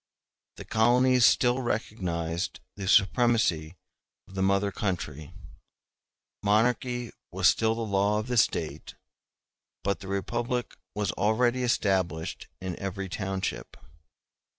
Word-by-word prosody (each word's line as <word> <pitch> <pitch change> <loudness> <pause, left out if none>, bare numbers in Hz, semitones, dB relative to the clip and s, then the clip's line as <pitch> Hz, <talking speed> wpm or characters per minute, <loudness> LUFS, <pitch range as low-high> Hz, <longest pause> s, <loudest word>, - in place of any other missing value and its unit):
The - - -10
colonies 125 +2 +4
still 125 +1 +3
recognized 90 -7 -2 0.2
the 100 -2 -6
supremacy 100 -7 +3 0.5
of - - -16
the 95 - -3
mother 100 +1 +2
country; 85 - -4 1.1
monarchy 120 +3 +1 0.2
was 90 +1 +3
still 110 0 +3
the 115 - -4
law 100 0 +1
of 105 - -2
the 125 0 -2
State; 105 - 0 0.9
but 100 +1 0
the 95 - -9
republic 120 +6 -2 0.2
was 105 -1 0
already 120 +4 +1
established 95 -9 0
in 95 -2 -5
every 95 0 -4
township. 95 - -4
100 Hz, 110 wpm, -28 LUFS, 95-120 Hz, 1.1 s, colonies